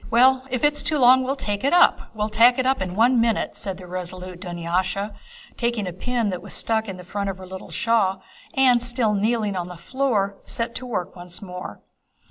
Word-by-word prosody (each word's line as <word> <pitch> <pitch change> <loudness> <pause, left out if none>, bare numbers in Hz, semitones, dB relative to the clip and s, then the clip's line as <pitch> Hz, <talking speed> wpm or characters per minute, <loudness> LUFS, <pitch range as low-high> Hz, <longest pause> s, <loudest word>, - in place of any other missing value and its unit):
"Well, 260 +3 +4
if 255 -2 -2
it's 295 0 +3
too 305 - +1
long 255 0 +6
we'll 260 +2 -1
tack 205 -7 -3
it 280 - +2
up... 355 - +4
we'll 210 0 -1
tack 230 +3 +5
it 260 - 0
up 265 -5 +2
in 185 -1 -3
one 235 +3 +4
minute," 230 -2 0
said 195 -3 -5
the 185 - -11
resolute 180 0 -5
Dunyásha 180 +3 -2 0.4
taking 235 -4 -1
a 180 - -3
needle 230 +3 -1
that 180 - -4
was - - -4
stuck 220 -1 0
on 190 - -6
the 180 - -10
front 200 +2 -3
of 190 - -5
her 190 - -10
little 190 0 -9
shawl 205 -5 +1 0.3
and, 255 -3 +5
still 240 -3 +1
kneeling 210 0 0
on 175 -1 -3
the 180 -1 -9
floor, 200 -1 -1
set 235 0 -3
to 255 - -6
work 185 -6 -3
once 175 0 -7
more. 180 - -8
210 Hz, 215 wpm, -23 LUFS, 185-245 Hz, 0.4 s, long